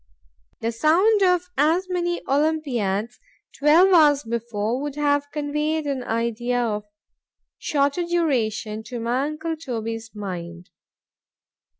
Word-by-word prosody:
The 230 - -1
sound 355 - +3
of 360 -1 +3
as 330 +6 +3
many 350 -1 -2
Olympiads, 255 -8 0 0.4
twelve 330 +6 +5
hours 295 -4 +5
before, 230 0 -2
would 290 -1 -4
have 285 -1 +1
conveyed 300 +1 -1
an 275 -3 -2
idea 235 +1 -1
of 210 -3 -1 0.7
shorter 285 +3 0
duration 245 -11 -1
to 245 -2 -6
my 240 +4 0
uncle 315 +2 -4
Toby's 225 -6 -5
mind. 180 -3 -7
280 Hz, 110 wpm, -23 LUFS, 225-315 Hz, 0.7 s, twelve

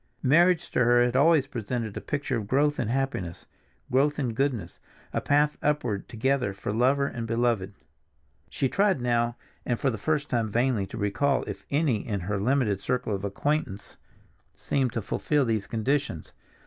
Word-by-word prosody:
Marriage 170 +5 +4
to 125 - +2
her 120 0 +5
had 125 0 -1
always 150 +1 +5
presented 115 -4 -4
a - - -4
picture 145 -3 -2
of 110 -3 -3
growth 145 +5 +2
in 120 - 0
happiness, 120 -9 -2 0.5
growth 145 +3 +2
in 130 -5 -1
goodness, 115 -9 -2 0.3
a - - 0
path 150 +1 +2
upward 125 -9 -1
together 125 -3 0
for 100 +1 -4
lover 130 +5 +3
and 115 -4 -4
beloved. 115 -4 0 0.7
She 135 - 0
tried 195 +1 +2
now 120 -1 +1 0.3
and 120 -2 -1
for 135 - +1
the 110 - -5
first 150 +4 0
time 115 -5 0
vainly 120 -2 +1
to - - -8
recall 125 +7 +1
if - - -7
any 140 -5 +2
in 100 -2 -4
her 100 +3 -2
limited 110 -3 +1
circle 125 -1 -1
of 100 0 -3
acquaintance 100 -1 -2 0.6
seemed 130 -3 -1
to 115 - -2
fulfill 145 +6 0
these 110 -4 -1
conditions. 115 - -2
125 Hz, 170 wpm, -27 LUFS, 110-140 Hz, 0.7 s, her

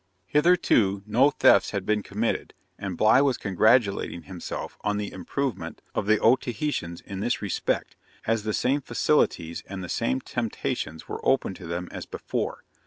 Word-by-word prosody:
Hitherto 120 - +3
no 120 +7 +4
thefts 100 -8 +5
had 100 -3 -3
been 105 0 +1
committed, 105 +3 -2 0.2
and 95 -3 -4
Bligh 110 +5 +5
was 135 -3 +2
congratulating 100 -2 +2
himself 90 -2 -6
on 105 -1 0
the 105 -1 -3
improvement 120 +6 -4
of - - -2
the 110 0 +5
Otaheitans 120 - 0
in 100 -1 -7
this 120 +3 0
respect, 100 -3 -2 0.3
as 115 -1 +1
the 110 +1 -2
same 135 +6 +1
facilities 85 - +1
and 95 -1 -6
the 90 - -7
same 65 +1 0
temptations 80 +1 -3
were - - -6
open 135 -7 +2
to 90 -2 -10
them 85 +1 -3
as - - -7
before. - - -4
105 Hz, 160 wpm, -26 LUFS, 95-125 Hz, 0.3 s, thefts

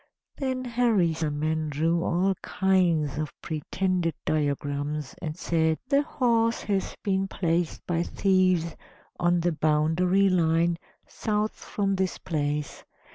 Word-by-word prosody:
Then 260 -2 -2
Harisarman 160 -10 +1
drew 165 +4 +1
all 185 +3 +2
kinds 170 -7 +1
of 155 -1 -5
pretended 170 +1 -1
diagrams, 145 0 -1
and 155 -2 -4
said: 160 -2 +1
"The 280 0 +4
horse 230 -5 +1
has 195 -2 -1
been 195 -2 +1
placed 170 -3 -1
by 170 -1 0
thieves 185 -3 +2 0.4
on 175 0 +2
the 175 +1 +1
boundary 160 +5 +2
line 170 -1 +2 0.3
south 210 0 -1
from 195 -1 -2
this 190 -1 -1
place. 150 -2 -3
170 Hz, 115 wpm, -26 LUFS, 155-195 Hz, 0.4 s, The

